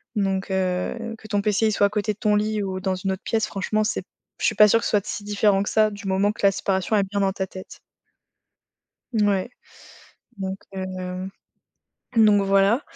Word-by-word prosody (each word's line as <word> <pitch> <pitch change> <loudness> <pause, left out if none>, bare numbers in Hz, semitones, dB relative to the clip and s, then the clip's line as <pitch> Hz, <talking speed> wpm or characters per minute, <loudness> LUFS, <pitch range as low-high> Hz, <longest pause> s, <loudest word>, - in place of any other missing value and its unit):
Donc, 195 -2 -1
heu, 190 +5 -2
que 215 - -13
ton 205 -1 0
PC, 215 +1 +2
il - - +2
soit 200 - +4
à - - -7
côté 210 +1 -1
de 205 - -23
ton 210 -1 +2
lit 215 0 -1
ou 190 -1 -3
dans 185 0 -1
une 190 +1 -2
autre 190 +2 -5
pièce, 220 -1 0
franchement, 215 +2 -1
c'est 215 - -2 0.4
je - - -1
suis - - +2
pas 210 - +8
sûre 230 - +4
que - - -5
ce - - 0
soit 205 -2 +2
si 205 - -5
différent 205 -1 +2
que - - -3
ça 215 -1 +3
du 205 -1 -8
moment 195 +2 +2
que 200 - -2
la 195 - +6
séparation 190 +2 0
est 200 - +3
bien 200 +1 -3
dans 195 -1 +2
ta 190 -1 -3
tête. 185 - -11 1.3
Mouais 205 0 +1 0.9
donc, 190 0 -4 0.2
heu, 185 0 -5 0.9
donc 210 -2 +5
voilà. 195 +6 +3
200 Hz, 210 wpm, -23 LUFS, 190-215 Hz, 1.3 s, pas